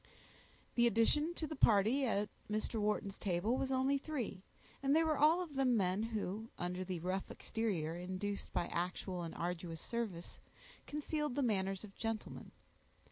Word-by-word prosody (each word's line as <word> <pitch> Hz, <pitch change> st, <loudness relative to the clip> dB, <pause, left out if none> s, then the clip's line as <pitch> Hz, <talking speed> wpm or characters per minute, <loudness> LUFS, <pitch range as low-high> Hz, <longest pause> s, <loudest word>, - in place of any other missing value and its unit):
The 240 Hz, 0 st, +5 dB
addition 295 Hz, -, +3 dB
to 320 Hz, -, -2 dB
the 310 Hz, -, -5 dB
party 230 Hz, +4 st, +4 dB
at 205 Hz, -2 st, +1 dB, 0.2 s
Mr. 215 Hz, +1 st, -1 dB
Wharton's 205 Hz, -1 st, 0 dB
table 200 Hz, +5 st, +1 dB
was 265 Hz, 0 st, -1 dB
only 265 Hz, +2 st, +3 dB
three, 260 Hz, -11 st, -3 dB, 0.4 s
and 275 Hz, +1 st, +3 dB
they 325 Hz, -, +6 dB
were 315 Hz, -1 st, +2 dB
all 320 Hz, +5 st, +6 dB
of 320 Hz, -5 st, -9 dB
them 260 Hz, -3 st, +3 dB
men 190 Hz, 0 st, +2 dB
who, 220 Hz, -1 st, -3 dB
under 180 Hz, +1 st, -2 dB
the 185 Hz, -2 st, -3 dB
rough 185 Hz, +2 st, -1 dB
exterior 180 Hz, -8 st, -2 dB
induced 185 Hz, +3 st, -3 dB
by 175 Hz, -, 0 dB
actual 180 Hz, +1 st, -2 dB
and 165 Hz, -1 st, -5 dB
arduous 170 Hz, -1 st, -3 dB
service, 215 Hz, -7 st, -4 dB, 0.5 s
concealed 300 Hz, -2 st, -2 dB
the 285 Hz, -, +2 dB
manners 195 Hz, -4 st, 0 dB
of 205 Hz, -2 st, -10 dB
gentlemen. 225 Hz, 0 st, -4 dB
215 Hz, 160 wpm, -37 LUFS, 185-265 Hz, 0.5 s, they